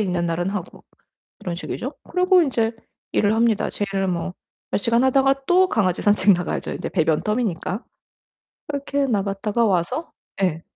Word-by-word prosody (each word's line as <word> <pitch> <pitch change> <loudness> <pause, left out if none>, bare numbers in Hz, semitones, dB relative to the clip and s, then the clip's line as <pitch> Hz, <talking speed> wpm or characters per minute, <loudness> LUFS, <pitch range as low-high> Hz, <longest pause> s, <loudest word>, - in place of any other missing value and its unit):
있는 180 -4 0
날은 170 +2 -1
하고 195 -3 -6 0.6
이런 175 - -4
식이죠. 245 - -5
그리고 365 0 +4
인제 230 -6 0 0.4
일을 210 +1 +2
합니다. 225 -2 +2
제 205 - -2
일 195 0 +1
뭐 180 0 -2 0.4
몇 - - +2
시간 230 +4 +2
하다가 270 +1 +2
또 370 +1 +5
강아지 185 - +1
산책 205 -1 +4
나가야죠, 175 -1 -2
이제 - - -4
배변 160 -3 +1
텀이니까. 210 -2 -1 0.9
그렇게 280 -1 -1
나갔다가 205 +1 0
와서 195 - 0 0.3
예 165 -4 +1
210 Hz, 325 characters per minute, -22 LUFS, 180-265 Hz, 0.9 s, 또